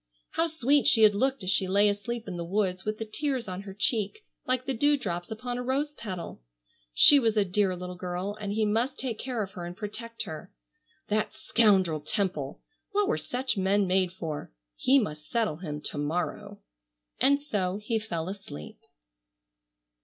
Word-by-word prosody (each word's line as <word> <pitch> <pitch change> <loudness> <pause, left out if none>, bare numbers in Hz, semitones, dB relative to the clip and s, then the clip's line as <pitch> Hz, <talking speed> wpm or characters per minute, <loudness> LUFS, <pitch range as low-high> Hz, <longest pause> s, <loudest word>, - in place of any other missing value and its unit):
How 330 - +1
sweet 290 -2 +2
she 225 - +6
had 210 -1 +7
looked 260 +2 0
as 185 - +1
she 190 0 +3
lay 200 +2 +4
asleep 210 +3 -2
in 185 - -4
the 170 - -3
woods 185 0 -1
with 215 0 -1
the 225 - -4
tears 260 +2 -2
on 185 0 -4
her 195 -1 -9
cheek 215 - 0 0.2
like 255 0 +1
the 270 - 0
dew 290 +4 +3
drops 175 -8 -4
upon 245 +2 -4
a - - -3
rose 280 +4 0
petal! 185 - -6 0.5
She 285 - +8
was 225 -4 +1
a 205 - +4
dear 185 0 +1
little 180 0 -6
girl 180 +3 -3
and 205 -1 -3
he 215 +1 +1
must 230 +6 0
take 245 -4 -3
care 245 -4 -2
of 195 - -7
her 180 -2 -7
and 175 +1 -7
protect 230 +2 -5
her. 155 -1 -8 0.6
That 215 0 0
scoundrel 190 -8 +3
Temple! 155 -4 -2 0.3
What 410 0 +2
were 455 - +1
such 255 -2 -2
men 195 +1 +2
made 185 -1 +2
for? 160 - -5 0.2
He 270 +2 +4
must 155 - -2
settle 220 -10 0
him 150 -4 -5
to 145 - -4
morrow. 180 +7 -2 0.6
And 280 +1 +5
so 200 -10 -1
he 220 +2 -1
fell 170 -7 -4
asleep. 190 - -8
205 Hz, 185 wpm, -28 LUFS, 185-240 Hz, 0.6 s, She